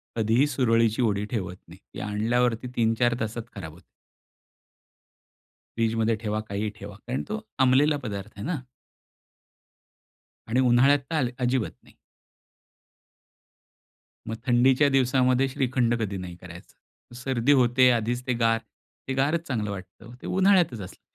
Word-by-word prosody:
कधीही 115 +5 +2
सुरळीची 115 -4 +2
वडी 105 -3 +1
ठेवत 95 -6 -3
नाही. 85 +3 -14
ती - - -7
आणल्यावरती 115 +3 0
3-4 115 +1 +2
तासात 110 +1 -3
खराब 80 -6 -8
होते. 85 +2 -18 1.9
फ्रिजमध्ये 115 0 +1
ठेवा, 110 -1 -3
काहीही 105 +1 -2
ठेवा 100 0 -9
कारण 130 +2 -2
तो 215 +1 -3 0.2
अंबलेला 135 +3 +4
पदार्थ 105 -2 -5
आहे 100 - -6
ना. 165 +3 -1 1.9
आणि 115 +3 +1
उन्हाळ्यात 130 +3 +5
तर - - 0
अल 130 -5 +1
अजिबात 125 -2 0
नाही. - - -21 2.3
मग 110 - -3
थंडीच्या 130 +3 +4
दिवसामध्ये 130 0 +3
श्रीखंड 125 -2 0
कधी 100 -3 -2
नाही 90 -2 -7
करायचा. 90 +6 -15
सर्दी 125 +1 0
होते, 125 -1 +5
आधीच 120 +1 -1
ते 125 - +1
गार, 115 -1 +2 0.5
ते 135 - -1
गारच 150 +5 0
चांगलं 110 -6 -2
वाटतं, 100 +4 -10
ते - - -7
उन्हाळ्यातच 185 - +3
असलं 90 - -11
120 Hz, 130 wpm, -26 LUFS, 110-130 Hz, 2.3 s, उन्हाळ्यात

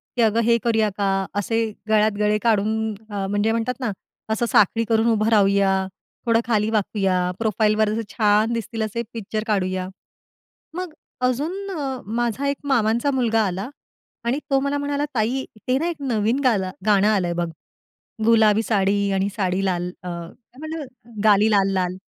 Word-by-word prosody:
की 245 - +1
अगं 225 0 +3
हे 235 +1 +4
करूया 220 -2 +2
का? 195 -1 +1
असे 225 +3 0 0.2
गळ्यात 215 0 +4
गळे 210 0 +2
काढून 220 0 +1 0.2
अ, 200 -2 -3
म्हणजे 205 +2 +1
म्हणतात 230 +2 -1
ना 245 -5 -1 0.4
असं 230 +2 0
साखळी 210 +3 +4
करून 225 0 +3
उभं 215 0 +2
राहूया, 200 -2 +3 0.5
थोडं 230 -1 +3
खाली 215 -2 +1
वाकूया, 195 -4 0
प्रोफाइलवर 215 -1 +2
असे 220 +1 -1 0.2
छान 215 +1 +3
दिसतील 230 0 -4
असे 215 +2 -3
पिक्चर 215 -1 -4
काढूया. 185 -3 0 0.9
मग 360 -1 -5 0.3
अजून 335 +11 -2
अ, 275 -7 -3
माझा 240 +4 -1
एक 280 - 0
मामांचा 240 -1 +2
मुलगा 230 -4 +2
आला 190 +4 -3 0.6
आणि 250 +4 +1
तो 275 - +4
मला 280 +1 -1
म्हणाला, 285 0 -1
"ताई 245 +4 0 0.2
ते 255 - +3
ना 330 +4 -1
एक 340 - -3
नवीन 235 0 0
गाला 200 -7 +2 0.2
गाणं 205 -1 +4
आलंय 190 -5 +1
बघ. 170 0 -1 0.8
गुलाबी 220 -1 +4
साडी 200 -1 +1
आणि 195 +1 +1
साडी 190 -2 0
लाल 180 -2 -1
अ, 180 - -6
म्हटलं 250 - -7 0.4
गाली 210 0 +5
लाल 195 -2 +3
लाल." 180 -1 -1
220 Hz, 160 wpm, -22 LUFS, 200-235 Hz, 0.9 s, गाली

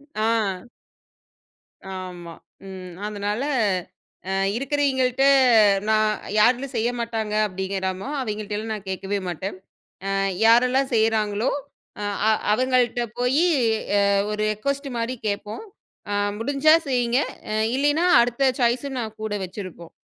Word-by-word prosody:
ஆ. 215 -2 0 1.3
ஆமா. 180 -2 -7 0.3
ம். 185 -2 -9
அதனால 210 +4 -3 0.9
அ - - -1 0.3
இருக்கறவிங்கிள்ட்ட 270 -2 +1 0.6
நான் 215 0 +3 0.3
யார் 235 +4 +6
வீட்ல 275 +3 -6
செய்யமாட்டாங்க. 225 -2 -2
அப்படிங்கறமோ 190 +2 -3
அவங்கிள்ட்டலாம் 215 -1 -4
நான் 200 -2 -7
கேக்கவே 195 +2 -2
மாட்டன். 185 +3 -4 0.5
அ - - -1 0.4
யாரெல்லாம் 250 +3 +4
செய்யறாங்களோ 220 0 +1 0.5
அ - - -3 0.3
அ - - +5 0.2
அவங்கள்ட்ட 250 0 +1 0.2
போயி 265 +7 +2 0.9
ஒரு 210 - -4
ரெகுவஸ்ட் 280 +6 -3
மாரி 235 +2 -2
கேப்போம். 210 - -4 0.5
அ - - 0 0.3
முடிஞ்சா 285 +6 +4
செய்யுங்க. 245 -1 +1 0.6
இல்லைனா 290 +5 +2 0.2
அடுத்த 245 +2 +2
சாய்ஸ் 245 +3 +1
நான் 220 -2 -5
கூட 215 -1 -3
வச்சிருப்போம். 180 -3 -9
225 Hz, 105 wpm, -23 LUFS, 205-255 Hz, 1.3 s, யார்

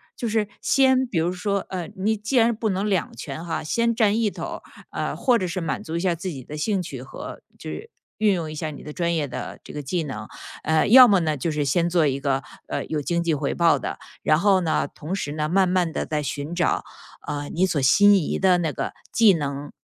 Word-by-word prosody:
就 235 - -3
是 215 -1 +1
先 260 -1 +3
比 200 - -3
如 165 +2 +1
说 200 +2 -1
呃， 185 -2 -4
你 210 +3 0
既 220 +5 -2
然 230 0 +4
不 220 0 -1
能 195 +2 -1
两 190 -4 0
全 145 +3 -7
哈， 170 -2 -3
先 230 +9 +1
占 215 -3 +3
一 220 - +2
头 - - -8
儿， - - -5 0.3
啊， - - -3
或 245 -3 +2
者 185 - -1
是 175 +2 -3
满 165 -5 -3
足 165 +1 -4
一 - - -1
下 180 -1 +1
自 175 +3 -5
己 135 -7 -7
的 150 - -8
兴 190 +5 0
趣， 135 -7 -7
和 135 - -9 0.2
就 - - -7 0.5
运 210 -3 +3
用 160 -3 -3
一 - - -6
下 155 +1 -3
你 145 - -9
的 150 - -8
专 170 0 0
业 150 -3 -1
的 125 -1 -6
这 - - -11
个 150 - -4
技 165 +5 -2
能。 110 -8 -6 0.3
呃， 160 -1 +2
要 250 +3 +10
么 200 -4 +4
呢 155 -2 0
就 160 - -2
是 150 -1 -1
先 170 +5 +2
做 170 -2 +3
一 135 -1 0
个， 135 -1 0 0.2
呃， - - -3
有 155 -2 -2
经 170 +3 -1
济 165 - +1
回 145 - -1
报 170 -1 +4
的， - - -4 0.2
然 155 - +3
后 190 0 +4
呢， 160 -2 0
同 165 +5 -6
时 145 -7 -3
呢， 155 0 -2
慢 190 +1 +3
慢 180 -2 +1
地 - - -2
再 150 -1 -2
寻 145 +2 -4
找， 175 0 +1 0.4
呃， 145 0 -4
你 180 +3 +1
所 165 -6 0
心 205 +10 +6
仪 190 -6 +1
的 185 -2 +4
那 165 -3 0
个 - - -4 0.2
既 225 -4 +6
能、 145 -3 -3
170 Hz, 265 characters per minute, -24 LUFS, 150-200 Hz, 0.5 s, 要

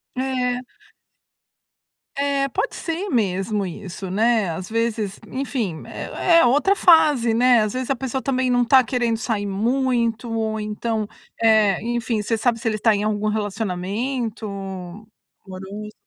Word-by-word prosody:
É. 255 -1 -1 1.5
É, 280 0 0
pode 400 - -2
ser 345 +5 -3
mesmo 205 - 0
isso, 190 +1 -7
né. 220 -2 +2
Às 180 +3 -6
vezes, 225 -3 -1
enfim, 250 - -3
é 340 -2 +1
é - - +5
outra 295 +11 +3
fase, 305 - +5
né. 245 0 +5
Às 215 - -2
vezes 255 -1 -3
a 275 - +2
pessoa 265 +1 -3
também 260 -2 0
não 245 0 +3
tá 260 +2 +5
querendo 240 -1 0
sair 220 -3 -2
muito 235 +2 0
ou, 220 -1 -1
então, 215 +1 -2 0.3
é 215 -4 +4
enfim, 235 -1 -1
você 225 +2 -1
sabe 230 +1 +1
se 230 - -3
ele 220 - +1
está 215 +1 +3
em 205 - -1
algum 215 0 0
relacionamento 215 +3 -3 1.0
amoroso? 195 +3 -8
230 Hz, 140 wpm, -22 LUFS, 210-255 Hz, 1.5 s, é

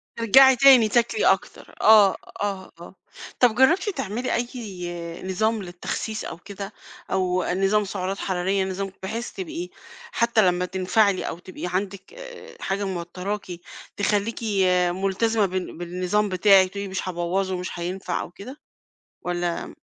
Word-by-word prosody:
ترجعي 265 +4 +6
تاني 250 -3 +7
تاكلي 240 - +1
أكتر، - - 0
آه، 210 -3 +7 0.3
آه، 195 -2 -3
آه 175 - -12 0.4
طَب 245 -3 +4
جرّبتِ 325 - +4
تعملي 245 - -3
أي 180 -9 -5
نظام 215 +4 0
للتخسيس 180 +4 -5
أو 165 - -6
كده؟ 200 +3 -8 0.4
أو 185 -1 +1
نظام 195 +3 +2
سُعرات 195 0 -3
حرارية، 190 +1 0
نظام 190 +1 -4
بحيث 230 +5 -4
تبقي 355 -2 -6 0.4
حتى 235 -1 +2
لمّا 180 0 +1
تنفعلي 190 +2 +1
أو 170 - -5
تبقى 185 0 -8
عندِك 195 - -4
آآ، - - -11
حاجة 195 +1 -1
موتراكِ، 185 +2 -4 0.5
تخليكِ 205 +2 0 0.5
ملتزمة 195 +4 +1
بال 185 -2 -4
بالنظام 180 +4 -1
بتاعِك، 190 +1 +5
وتقولي 200 +1 -5
مش 190 0 -4
هابوّظُه 185 +2 -1
مش 180 -1 -6
هينفع 180 +3 -3
أو - - -8
كده؟ 245 +10 -10 0.6
والَّا 175 -1 -3
195 Hz, 135 wpm, -24 LUFS, 185-225 Hz, 0.6 s, تاني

